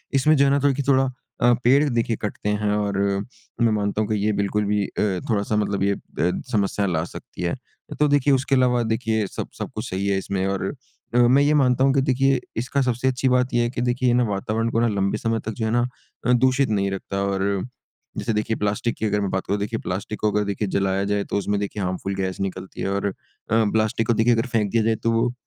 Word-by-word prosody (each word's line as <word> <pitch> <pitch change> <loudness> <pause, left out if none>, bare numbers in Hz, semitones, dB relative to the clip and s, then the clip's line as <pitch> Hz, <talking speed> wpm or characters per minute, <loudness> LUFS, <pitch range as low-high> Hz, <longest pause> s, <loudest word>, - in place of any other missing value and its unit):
इसमें 155 +3 +4
जो 140 0 +4
है 140 - +3
ना 140 - +4
कि 140 - -6
थोड़ी 140 -2 +3
कि 140 - -2
थोड़ा 135 -1 +3 0.3
अ, 120 0 +5
पेड़ 135 +4 +5
देखिए 115 -1 0
कटते 105 0 -3
हैं 105 0 0
और 105 -1 -1 0.6
मैं 115 -1 +4
मानता 105 0 0
हूँ 105 - -2
कि 110 - +1
ये 110 - +3
बिल्कुल 100 +1 0
भी 105 0 +1
अ, - - -7 0.4
थोड़ा-सा 105 -1 0
मतलब 100 -2 0
ये 100 0 +2
अ, 90 -2 -2
समस्या 100 -2 +1
ला 80 -4 0
सकती - - -10
है। - - 0 0.4
तो 150 - +4
देखिए 145 -1 +3
उसके 135 +1 +2
अलावा 125 -1 +3
देखिए 110 -1 0
सब - - -5
सब - - -4
कुछ - - -4
सही 95 +2 -2
है 100 -1 +2
इसमें 95 0 -2
और 95 -1 -1 0.5
अ, - - +4
मैं 125 +3 +5
ये 145 +1 +3
मानता 130 -3 +3
हूँ 135 - +4
कि 135 - +3
देखिए 135 0 +2 0.2
इसका 130 +4 0
सबसे 125 0 0
अच्छी 130 0 +1
बात 125 0 +2
ये 120 0 +3
है 120 - 0
कि 125 -1 -4
देखिए 125 +1 0
ये 120 - +3
ना 125 - +3
वातावरण 110 +3 -1
को 115 - +1
ना 120 - +3
लंबे 100 -1 0
समय 115 0 -1
तक 110 - -2
जो 110 +1 -3
है 110 - 0
ना 120 +1 +2 0.4
अ, 125 - +3
दूषित 130 +1 +3
नहीं 100 -2 0
रखता। 95 0 -3
और 100 -1 -1 0.7
जैसे 115 - -1
देखिए 105 +1 0
प्लास्टिक 105 +3 -1
की 110 - -2
अगर 105 0 +1
मैं 100 - -1
बात 95 - -2
करूँ 100 +2 0
देखिए 105 +3 -2
प्लास्टिक 95 +3 -4
को 105 - +1
अगर 105 0 +1
देखिए 100 +1 -2
जलाया 95 0 +1
जाए। 100 - 0
तो - - -3
उसमें 100 0 0
देखिए 100 0 -3
हार्मफुल 95 +2 -3
गैस 95 -1 -3
निकलती 95 0 -5
है - - -1
और 100 +1 -1
अ, 100 - -1 0.4
प्लास्टिक 110 0 +1
को 120 - +4
देखिए 115 +2 +3
अगर 115 +2 0
फेंक 105 -4 0
दिया 115 -1 +2
जाए 115 0 +2
तो 115 - +2
वो 115 +2 +1
110 Hz, 250 wpm, -23 LUFS, 100-125 Hz, 0.7 s, अ